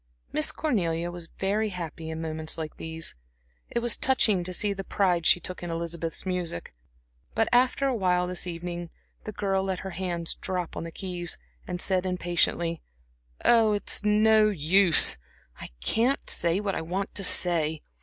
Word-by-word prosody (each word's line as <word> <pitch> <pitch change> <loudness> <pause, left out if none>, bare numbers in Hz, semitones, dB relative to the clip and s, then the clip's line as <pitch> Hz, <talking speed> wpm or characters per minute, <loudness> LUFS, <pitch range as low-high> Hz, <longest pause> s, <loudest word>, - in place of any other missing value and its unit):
Miss 150 - +3
Cornelia 175 - -1
was 175 -1 -7
very 210 +3 0
happy 165 -3 -6
in 160 0 -5
moments 160 0 -3
like 155 -2 -6
these. 160 0 -4 0.6
It 235 - -1
was 235 -2 +2
touching 220 -8 +3
to 185 - -4
see 200 +3 +1
the 195 0 -6
pride 180 -4 +1
she - - +6
took 180 +1 -6
in 175 - -5
Elizabeth's 165 0 -3
music. 180 - -3 0.6
But 225 - +2
after 250 +3 +3
awhile 185 -8 +1
this 180 0 -1
evening 175 0 -5 0.4
the 215 - -4
girl 195 -2 0
let 190 -1 -2
her 190 - -6
hands 175 -2 -2
drop 180 -3 -4
on - - -4
the 165 - -7
keys, 175 -2 -3 0.3
and 180 -1 -4
said 185 0 +2
impatiently: 175 -2 0 0.6
"Oh, 225 -2 +5
it's 205 0 -1
no 215 +1 +5
use, 180 - +4 0.4
I - - -8
can't 240 - +1
say 170 +2 +2
what 205 -2 -2
I - - -2
want 185 +5 -3
to 200 - -2
say. 160 -4 +3
180 Hz, 165 wpm, -27 LUFS, 170-200 Hz, 0.6 s, she